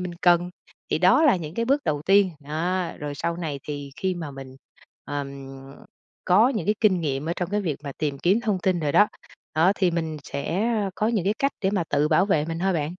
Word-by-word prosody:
mình 180 -1 -5
cần. 175 0 +4 0.4
Thì - - +1
đó 185 - +5
là 275 -9 +5
những 165 -1 -7
cái 230 - 0
bước 275 +4 +1
đầu 145 -2 -1
tiên, 195 +2 +4
đó, 170 +5 -2
rồi 145 -1 -5
sau 170 +4 -2
này 155 -5 -4
thì 145 -2 -6
khi 185 -1 -1
mà 160 -4 -6
mình, 135 -1 -10 0.5
ừm, 145 -1 -4 1.0
có 205 +7 +5
những 230 -6 -2
cái 210 - +3
kinh 195 -5 +3
nghiệm 145 -1 -2
ở - - +1
trong 180 -1 -3
cái 210 0 0
việc 160 -8 -2
mà 140 - -5
tìm 145 -3 -2
kiếm 195 +6 +2
thông 210 -5 0
tin 185 -1 0
rồi 145 -2 -1
đó, 210 - +5 0.5
đó 165 +5 +4
thì 185 -3 +2
mình 160 -2 -2
sẽ 170 +8 -2 0.3
có 215 - 0
những 215 -6 0
cái 205 +2 +1
cách 275 0 +1
để 190 -1 +1
mà 190 -5 0
tự 145 +1 +2
bảo 170 +5 +3
vệ 155 -7 +2
mình 165 +1 -4
thôi 190 +2 +1
bạn. 160 0 -2
175 Hz, 235 wpm, -24 LUFS, 150-195 Hz, 1.0 s, đó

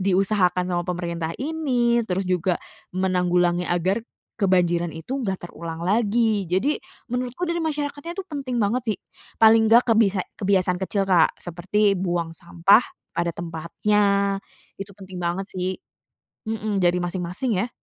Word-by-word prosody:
diusahakan 185 -1 +2
sama 175 - 0
pemerintah 170 -2 -3
ini, 255 -5 +1
terus 185 +2 -1
juga 180 -1 +1 0.4
menanggulangi 180 -1 +1
agar 180 +5 +1 0.4
kebanjiran 175 -3 +2
itu 255 - -4
gak 195 -7 -3
terulang 165 0 -6
lagi. 215 0 +2
Jadi, 190 - +1 0.3
menurutku 250 +7 -2
dari 340 0 -1
masyarakatnya 300 +1 -3
tuh 390 - -4
penting 275 -6 -4
banget 230 +3 +1
sih, - - -16 0.4
paling 220 0 +6
gak, 235 +2 +6
kebisa 200 -4 +3 0.2
kebiasaan 185 -2 +2
kecil 195 +1 0
Kak, 180 -4 +3
seperti 185 +4 +1
buang 175 -2 -1
sampah 170 +6 +4 0.3
pada 170 - 0
tempatnya, 200 +4 0 0.4
itu 195 0 -7
penting 190 -2 -9
banget 175 +3 -1
sih. 185 0 -3 0.7
Hmm, 215 -1 -2
jadi 175 0 +3
masing-masing 180 +7 -2
ya. - - -6
190 Hz, 135 wpm, -24 LUFS, 175-225 Hz, 0.7 s, paling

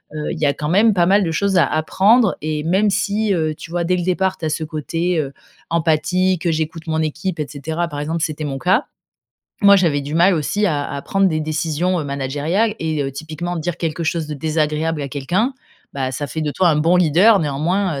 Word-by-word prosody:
Heu, 150 -1 -3
il 165 - -5
y 150 - +2
a 140 - +2
quand 150 - -4
même 210 +5 +4
pas 175 -2 +3
mal 200 +2 +4
de 165 - -1
choses 195 +4 +1
à 175 - +4
apprendre 195 +8 +3
et 155 -1 -2
même 190 +6 +2
si, 205 +1 0
heu, 155 -3 0
tu - - -11
vois 175 +1 -1
dès 180 +2 +1
le 175 - -2
départ 185 +1 0
tu 160 - -5
as 155 - 0
ce 155 +1 -2
côté, 165 +3 -2
heu, 140 -2 -3 0.4
empathie, 170 +3 +1
que 170 0 0
j'écoute 160 +1 -3
mon 160 0 0
équipe 160 +3 -3
et 150 - -1
cetera, 160 +4 -3
par 145 -2 -6
exemple 160 +2 -2
c'était 155 0 -3
mon 135 -2 -3
cas. 190 - +2 0.8
Moi 200 0 +8
j'avais 160 -7 +1
du 145 +2 -5
mal 175 +3 +4
aussi 205 +7 0
à 145 -5 0
à 140 - -4
prendre 195 -1 +2
des 155 -2 -1
décisions, 155 +3 -1
heu, 150 - -4
managériales 145 +10 -1
et 155 -2 -1
heu, 135 - -3
typiquement 160 +4 -5
dire 170 +1 -3
quelque 165 0 -2
chose 160 0 -1
de 150 - -5
désagréable 155 +1 -1
à 140 - -4
quelqu'un, 175 - -1 0.4
bah, 130 -1 -2
ça 145 - -3
fait 160 +2 -4
de 150 - -1
toi 180 +4 +2
un 155 - +3
bon 165 +4 +3
leader 180 +6 +5
néanmoins, 160 +2 -1
160 Hz, 230 wpm, -19 LUFS, 150-185 Hz, 0.8 s, Moi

